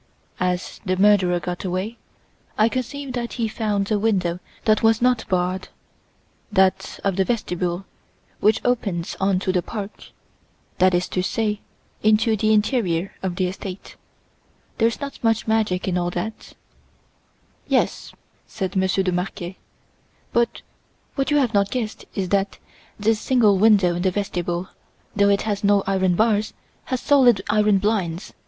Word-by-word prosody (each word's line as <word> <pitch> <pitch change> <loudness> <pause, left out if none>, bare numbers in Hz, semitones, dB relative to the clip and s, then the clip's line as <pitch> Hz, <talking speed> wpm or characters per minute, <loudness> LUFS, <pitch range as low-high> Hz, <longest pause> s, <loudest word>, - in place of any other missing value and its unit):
As 180 0 -2
the 185 -2 -1
murderer 190 -3 +4
got 175 0 -5
away, 190 +5 -3 0.6
I 215 +2 +4
conceive 255 +2 -4
that 240 -1 -3
he 230 -3 -1
found 210 -2 -1
a 210 - +2
window 185 -5 0 0.3
that 215 0 +3
was 225 -1 +4
not 245 -1 +2
barred, 185 0 0 0.8
that 190 -2 +1
of 195 -2 0
the 190 - +4
vestibule, 180 -4 -2 0.5
which 215 +1 +2
opens 205 -9 -1
on 195 -1 +2
to 190 - 0
the 180 -1 +1
park, 205 +2 -7 0.7
that 185 0 +5
is 175 +1 0
to 185 - -1
say, 210 +2 -1 0.4
into 220 +1 +3
the 215 +1 +1
interior 210 -5 +1
of 185 -2 -2
the 185 - 0
estate. 185 +1 -7 0.8
There's 230 0 +2
not 280 -3 -7
much 225 -1 +2
magic 215 -5 +1
in 180 -1 +1
all 175 0 -1
that." 180 +5 -5 1.1
"Yes," - - 0 0.4
said 190 -1 -4
Monsieur 190 0 +2
de 185 - 0
Marquet, 180 0 -4 0.7
"but 235 0 0 0.5
what 275 -1 -1
you 295 - +3
have 255 -5 +2
not 200 -1 +2
guessed 230 -3 -4
is 190 -3 -2
that 195 0 0 0.4
this 215 +1 +2
single 215 -6 +3
window 200 -4 +5
in 175 - -2
the 190 - +2
vestibule, 180 -2 -3 0.5
though 200 0 +4
it 200 0 +2
has 205 -2 -2
no 200 -1 +4
iron 190 -2 +1
bars, 215 +1 +1 0.3
has 255 - -2
solid 255 -8 +4
iron 210 -1 +4
blinds. 195 -4 -1
200 Hz, 150 wpm, -22 LUFS, 185-220 Hz, 1.1 s, that